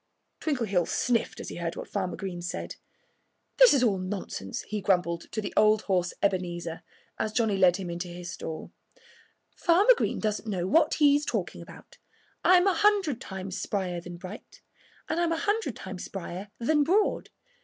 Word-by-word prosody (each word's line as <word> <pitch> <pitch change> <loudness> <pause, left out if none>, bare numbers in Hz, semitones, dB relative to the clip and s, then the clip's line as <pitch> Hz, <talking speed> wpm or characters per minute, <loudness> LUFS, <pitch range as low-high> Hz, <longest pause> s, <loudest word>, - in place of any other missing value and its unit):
Twinkleheels 220 - 0
sniffed 235 -2 0
as - - -6
he - - -7
heard 170 -1 -3
what - - -7
Farmer 185 -3 -2
Green 185 -3 -5
said. 175 - -5 0.8
"This - - +8
is 270 -3 +4
all 205 -6 +2
nonsense," 185 - -5
he 210 -1 -4
grumbled 175 -3 0
to 215 - -2
the 205 - -5
old 215 0 +4
horse 180 -3 +1
Ebenezer 175 -4 -1 0.4
as 215 - -1
Johnnie 215 -3 +1
led 180 -2 +5
him 185 -3 -5
into 175 +1 -4
his 175 0 -7
stall. 160 -2 -6 0.8
"Farmer 390 +8 +5
Green - - -1
doesn't 215 0 -2
know 180 -4 -1
what 310 - +3
he's 290 -1 +4
talking - - -3
about. - - -14 0.4
I'm 365 0 +6
a 390 - +4
hundred 380 - +2
times 190 -1 -5
sprier 180 -4 -2
than 175 -1 -8
Bright. 185 +4 -11 0.4
And 320 - -1
I'm 340 -1 +1
a 330 - +1
hundred 415 - 0
times 190 -1 -7
sprier 190 +1 -6
than 295 +5 +2
Broad. 390 +8 +1
200 Hz, 170 wpm, -28 LUFS, 180-290 Hz, 0.8 s, This